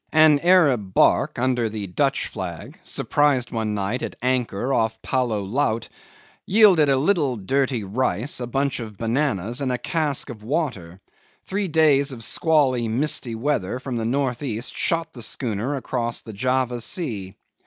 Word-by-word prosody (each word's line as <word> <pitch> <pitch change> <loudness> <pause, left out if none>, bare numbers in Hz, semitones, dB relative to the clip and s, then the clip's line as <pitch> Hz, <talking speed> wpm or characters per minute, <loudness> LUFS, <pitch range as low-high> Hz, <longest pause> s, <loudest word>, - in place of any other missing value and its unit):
An 155 -2 +6
Arab 140 - +3
barque, - - +3
under 125 -2 +1
the 105 -1 -5
Dutch 135 +9 0
flag, 95 - -7
surprised 145 -5 +1
one 110 -2 -2
night 100 +5 -2
at - - -5
anchor 125 -1 -1
off 110 -2 0
Poulo 120 -6 0
Laut, 115 +2 -1 0.5
yielded 190 -8 +5
a 135 - +4
little 145 -3 +1
dirty 125 +3 0
rice, 115 +4 -1
a 120 - -4
bunch 135 +3 -1
of 110 -4 -8
bananas, 115 -1 -1
and 130 -2 0
a 125 - 0
cask 145 -2 -1
of 110 -3 -11
water; 105 - -3 0.5
three 200 0 -2
days 150 -4 +3
of 120 -3 -6
squally, 130 - +2
misty 120 0 0
weather 125 -4 -1
from 130 -1 -5
the 115 - -2
north 125 0 -1
east 120 -4 -3
shot 165 -1 0
the 120 - -9
schooner 115 +3 -2
across 120 -3 -3
the 110 - -9
Java 125 +2 0
Sea. 110 - -3
125 Hz, 155 wpm, -23 LUFS, 110-145 Hz, 0.5 s, An